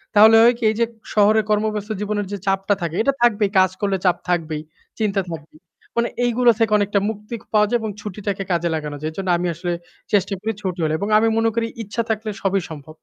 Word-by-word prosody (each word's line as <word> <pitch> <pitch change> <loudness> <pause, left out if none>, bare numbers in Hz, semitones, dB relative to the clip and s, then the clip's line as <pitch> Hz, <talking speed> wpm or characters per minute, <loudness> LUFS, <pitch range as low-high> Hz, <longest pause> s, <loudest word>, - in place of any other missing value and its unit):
তাহলে 220 +2 +8
হয় 240 +1 +6
কি? 240 - -9
এইযে 230 +2 +1 0.3
শহরে 215 +1 +4
কর্মব্যস্ত 210 0 0
জীবনের 210 0 -2
যে 205 - -3
চাপটা 195 +1 +2
থাকে, 170 -1 -3
এটা 275 +5 +2
থাকবেই, 210 -4 +3
কাজ 185 -1 +4
করলে 200 -1 +1
চাপ 180 - +3
থাকবেই, 160 -3 -1 0.4
চিন্তা 205 -2 +1
থাকবেই। 155 -1 -9 0.4
মানে 235 0 +2 0.2
এইগুলা 240 0 +4
থেকে 225 -1 +2
অনেকটা 205 0 +1
মুক্তি 210 +2 -6 0.2
পাওয়া 210 -1 +4
যায় 240 - +1
এবং 220 - -3
ছুটিটাকে 200 -1 -4
কাজে 170 0 +1
লাগানো 150 -2 -4
যায়। 155 - -2
এর - - -17
জন্য 190 -1 -3
আমি 175 +1 -1
আসলে 175 +2 -3 0.4
চেষ্টা 200 0 +2
করি 220 +2 -1
ছুটি 185 -3 -3
হলে 155 -1 +1
এবং 200 - -2
আমি 220 +1 +3
মনে 225 0 +3
করি 230 -1 0 0.2
ইচ্ছা 220 +3 -3
থাকলে 220 0 -1
সবই 195 0 +1
সম্ভব। 155 -1 -10
205 Hz, 210 wpm, -21 LUFS, 180-220 Hz, 0.4 s, তাহলে